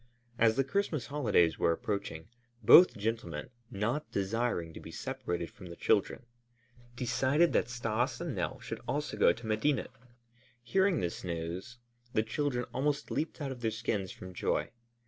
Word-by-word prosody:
As 110 -1 +5
the 135 - +3
Christmas 155 - -1
holidays 105 - +2
were 85 - +3
approaching, 100 -2 -3 0.4
both 180 - +9
gentlemen, 115 +3 -3 0.2
not 115 +9 -2
desiring 100 -4 -1
to - - -8
be - - -10
separated 85 -1 -4
from 95 -3 -12
the 85 - -8
children, 120 - +1 0.7
decided 130 +7 +2
that 115 - +2
Stas 120 +1 -1
and - - -3
Nell - - -2
should - - -6
also - - -2
go - - +5
to 115 +6 -7
Medinet. 110 +6 0 0.7
Hearing 190 +6 +2
this 85 -1 -3
news 90 +7 -4 0.4
the 110 - +3
children 125 +1 -1
almost 145 +3 -1
leaped 160 0 -2
out 140 -2 -2
of 125 -2 -7
their 115 - +1
skins 105 -3 -2
from 90 0 -10
joy. - - -1
115 Hz, 155 wpm, -32 LUFS, 95-135 Hz, 0.7 s, both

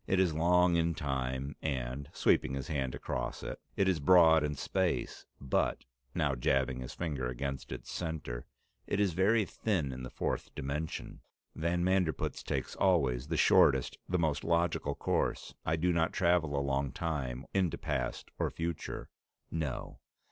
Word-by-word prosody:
"It 95 - +2
is 90 -4 +3
long 90 +2 +4
in 85 0 +1
time, 65 -1 -2
and" 65 -1 -3
sweeping 65 - +2
his 70 -2 -5
hand 65 -5 -1
across - - -4
it - - -5 0.2
"it 95 - +2
is 90 -4 +2
broad 80 0 +6
in 75 0 -1
space, 90 +5 -1
but" 70 - 0 0.3
now 75 -5 +2
jabbing 65 +1 +1
his 65 - -7
finger 75 -7 -2
against 65 +2 -4
its 65 -1 -6
center 80 -8 -4 0.4
"it - - 0
is 100 -4 +2
very 100 +5 +3
thin 90 -10 -1
in 65 0 -6
the 65 - -6
fourth - - -3
dimension. 75 +4 -4 0.3
Van 85 +2 0
Manderpootz 90 -3 +1
takes - - -3
always 70 -9 +2
the 80 0 -1
shortest, 65 -3 +4
the 90 - +2
most 80 -4 0
logical 85 0 +1
course. - - -1
I 80 - +3
do 90 +2 +1
not 80 0 +1
travel 85 -5 +2
along 70 -1 0
time, 70 -6 -3
into 95 -5 +1
past - - -3
or - - +1
future. 85 -1 -4 0.4
No. 80 -5 -3
80 Hz, 155 wpm, -32 LUFS, 65-85 Hz, 0.4 s, broad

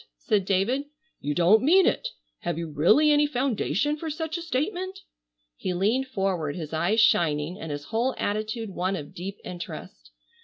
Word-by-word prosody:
said 210 -5 +1
David, 205 +9 +1 0.3
"you 145 +1 -2
don't 180 +6 +5
mean 355 +7 +5
it! - - +1 0.3
Have 175 -2 -3
you 165 -2 -4
really 215 - +5
any 295 0 +4
foundation 265 - 0
for 320 +1 -5
such 320 +1 -3
a 340 - -3
statement?" 360 +5 -2 0.5
He 180 - -3
leaned 225 +9 +1
forward, 190 - -1
his 160 -3 -6
eyes 175 +8 +1
shining 165 -4 +3
and 160 - -5
his 145 0 -4
whole 235 - -1
attitude 215 +1 -2
one 185 +1 -1
of 145 -5 -7
deep 195 +3 -6
interest. 115 - -8
205 Hz, 165 wpm, -26 LUFS, 170-275 Hz, 0.5 s, don't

